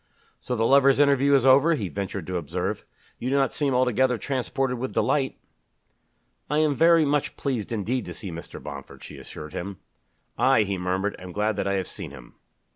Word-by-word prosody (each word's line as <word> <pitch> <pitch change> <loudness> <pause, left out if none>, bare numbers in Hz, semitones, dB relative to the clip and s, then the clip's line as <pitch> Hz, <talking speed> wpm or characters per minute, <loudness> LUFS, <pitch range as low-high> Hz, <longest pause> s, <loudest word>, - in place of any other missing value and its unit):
"So 125 - -3
the 115 -1 +1
lovers' 140 +1 +5
interview 140 -1 +4
is 135 -2 +3
over!" 140 +5 +6
he 105 -9 -3
ventured 100 -1 -4
to 90 +1 -3
observe. 80 -5 -3 0.3
"You 125 - -2
do 135 - +1
not 135 -3 +2
seem 140 -3 0
altogether 125 0 +2
transported 130 0 -2
with 130 +1 -4
delight." 135 -3 +1 1.1
"I 150 - +1
am 155 -1 +3
very 165 +2 +5
much 145 0 0
pleased 125 -7 -2
indeed 115 +3 -1
to - - -7
see 100 -5 -6
Mr. 85 0 -8
Bomford," - - -9
she - - -10
assured 75 0 -9
him. 95 +1 -5 0.6
"I," 125 -2 +4
he 100 -1 -2
murmured, 95 +3 -1
"am 90 0 -9
glad 105 +3 0
that 100 - -1
I 100 - +1
have 95 -1 -1
seen - - -8
him." - - -13
125 Hz, 195 wpm, -25 LUFS, 100-140 Hz, 1.1 s, over